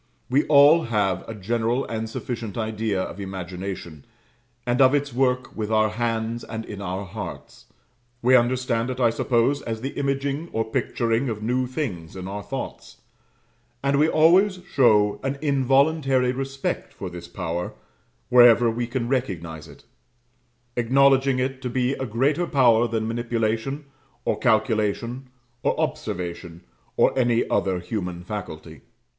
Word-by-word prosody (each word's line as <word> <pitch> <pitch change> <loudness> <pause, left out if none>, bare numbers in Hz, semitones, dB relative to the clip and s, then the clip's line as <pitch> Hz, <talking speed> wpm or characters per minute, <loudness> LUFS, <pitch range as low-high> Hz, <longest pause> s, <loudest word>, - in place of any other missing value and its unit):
We 140 +4 +3
all 150 +3 +6
have 105 -5 0
a 115 - -5
general 115 +5 -1
and 110 -1 -4
sufficient 115 -2 -5
idea 110 -3 -1
of 90 - -7
imagination, 95 -4 -6 0.6
and 120 +2 +1
of 130 +2 +6
its 145 -2 -1
work 125 0 0
with 110 -1 -3
our 110 0 +3
hands 115 +1 -2
and 115 0 -6
in 100 -1 -8
our 95 +1 -4
hearts: 95 -2 -8 0.6
we 130 +2 +6
understand 120 -1 +1
it, 130 0 -4
I 120 -2 +4
suppose, 125 +4 +1
as 110 -1 -5
the 135 +3 -3
imaging 140 +3 -2
or 110 0 0
picturing 115 +1 -1
of 105 -1 -4
new 125 +3 0
things 105 - -5
in 95 0 -6
our 100 +1 -5
thoughts; - - -7 0.9
and 140 0 +2
we 155 +2 +4
always 185 +4 +4
show 105 -6 +4
an 135 +1 -2
involuntary 135 -1 +2
respect 135 +1 -4
for - - -7
this 85 -1 -8
power, 85 0 -4 0.6
wherever 120 -1 +7
we 120 +1 -3
can 120 0 -2
recognize 85 - -3
it, - - -15 0.9
acknowledging 135 +2 +3
it 130 +1 -2
to 125 - -3
be 125 +1 0
a 130 -1 -4
greater 140 +10 +1
power 120 -6 +4
than 110 -1 -2
manipulation, 115 +4 -2 0.4
or - - 0
calculation, 115 +2 0 0.3
or - - 0
observation, 85 -1 -4 0.4
or - - +4
any 120 -2 +2
other 95 -2 +1
human 90 -2 -4
faculty. 80 -7 -7
120 Hz, 145 wpm, -24 LUFS, 105-135 Hz, 0.9 s, wherever